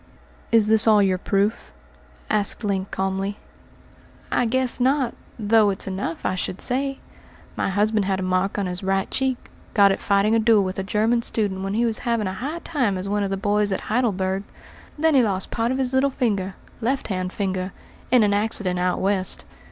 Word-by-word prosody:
"Is 225 -2 +5
this 220 +1 +4
all 210 -2 +6
your 185 -2 +1
proof?" 200 +4 -1 0.5
asked 210 +2 +2
Link 195 -2 -1
calmly. 195 +1 -2 0.9
"I 245 - +2
guess 255 +1 +1
not, 260 -1 +1 0.2
though 215 -1 +3
it's 195 - 0
enough, 190 -3 -4
I - - +1
should 185 0 -4
say. 270 +2 -1 0.6
My - - -1
husband 210 +1 +1
had 190 -1 0
a - - -2
mark 185 +2 0
on 200 - 0
his 180 0 -3
right 195 0 -1
cheek 265 -2 0 0.4
got 200 -2 +6
it - - -2
fighting 200 +1 +2
a 225 - +4
duel 220 -2 +4
with 185 0 -4
a - - -1
German 220 +4 +1
student 205 -5 +1
when 195 +1 -3
he 235 +2 +2
was 225 -2 0
having 230 -3 -1
a 185 - -3
high 295 - -5
time 250 - 0
as 185 +1 -5
one 205 +1 0
of 200 - -1
the 195 - -2
boys 205 +1 +1
at 190 - -1
Heidelberg. 195 -5 0 0.6
Then 320 +1 +2
he 270 - +6
lost 195 -5 0
part 230 +1 0
of 260 - -1
his 260 -1 -1
little 265 +1 +3
finger 205 -8 -1 0.3
left 260 +3 -1
hand 185 -2 -2
finger 190 -2 -3 0.4
in 250 -2 +5
an 205 -1 +2
accident 205 -3 0
out 180 0 0
West. 190 -1 -1
205 Hz, 200 wpm, -23 LUFS, 190-235 Hz, 0.9 s, all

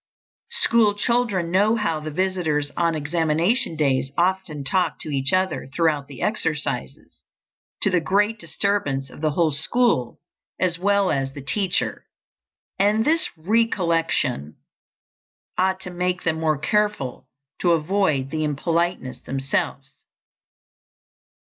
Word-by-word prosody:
School 225 - +4
children 205 -6 0
know 205 +5 +3
how 210 -8 -1
the 155 0 -6
visitors 160 -4 -1
on 170 -1 +1
examination 165 - 0
days 135 -3 +1
often 180 -4 0
talk 175 +4 0
to - - -6
each 135 0 +1
other 185 -4 0
throughout 150 -3 +1
the 140 -3 -8
exercises, 150 - -3 0.6
to 195 - +3
the 180 - +3
great 205 +6 +1
disturbance 145 -14 -1
of - - -12
the 155 - +2
whole 160 +1 +1
school 145 - +1 0.4
as 175 -1 +1
well 200 0 +2
as 135 -1 -1
the 140 - -8
teacher, 195 +5 0 0.7
and 210 +3 +3
this 325 +2 +3
recollection 165 - 0 1.0
ought 190 0 +1
to 180 -1 -6
make 180 +1 -2
them 160 -1 0
more 155 -2 +1
careful 205 - -1 0.3
to 175 -2 +3
avoid 155 -5 +1
the 155 -1 -1
impoliteness 165 -1 -1
themselves. 135 0 -3
170 Hz, 125 wpm, -23 LUFS, 145-195 Hz, 1.0 s, School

